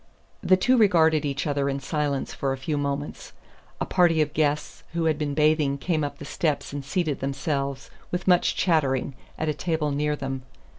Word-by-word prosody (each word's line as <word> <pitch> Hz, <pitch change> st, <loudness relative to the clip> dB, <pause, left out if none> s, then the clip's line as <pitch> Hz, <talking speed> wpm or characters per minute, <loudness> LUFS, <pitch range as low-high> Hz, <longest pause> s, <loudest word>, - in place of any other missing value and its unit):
The 185 Hz, -, +4 dB
two 250 Hz, +7 st, +3 dB
regarded 160 Hz, -7 st, +4 dB
each 140 Hz, -1 st, -2 dB
other 140 Hz, -2 st, 0 dB
in 135 Hz, 0 st, -2 dB
silence 145 Hz, -1 st, -2 dB
for 135 Hz, -, -1 dB
a -, -, -4 dB
few 140 Hz, +3 st, -2 dB
moments. 145 Hz, 0 st, -3 dB, 0.5 s
A -, -, -1 dB
party 175 Hz, -3 st, +3 dB
of 150 Hz, -1 st, +1 dB
guests 150 Hz, -1 st, 0 dB
who 170 Hz, -1 st, 0 dB
had 155 Hz, -2 st, +1 dB
been 145 Hz, -2 st, -2 dB
bathing 150 Hz, -2 st, +3 dB
came 155 Hz, +1 st, -1 dB
up 145 Hz, -1 st, -4 dB
the -, -, -9 dB
steps 150 Hz, -3 st, -1 dB
and 145 Hz, -1 st, -4 dB
seated 150 Hz, 0 st, -1 dB
themselves, 140 Hz, 0 st, -3 dB, 0.2 s
with 180 Hz, +1 st, -3 dB
much 180 Hz, -1 st, +4 dB
chattering, 145 Hz, -8 st, +1 dB, 0.2 s
at 155 Hz, -, -2 dB
a 155 Hz, -, +1 dB
table 155 Hz, -1 st, -1 dB
near 150 Hz, +1 st, 0 dB
them. 135 Hz, -2 st, -4 dB
150 Hz, 190 wpm, -25 LUFS, 140-160 Hz, 0.5 s, The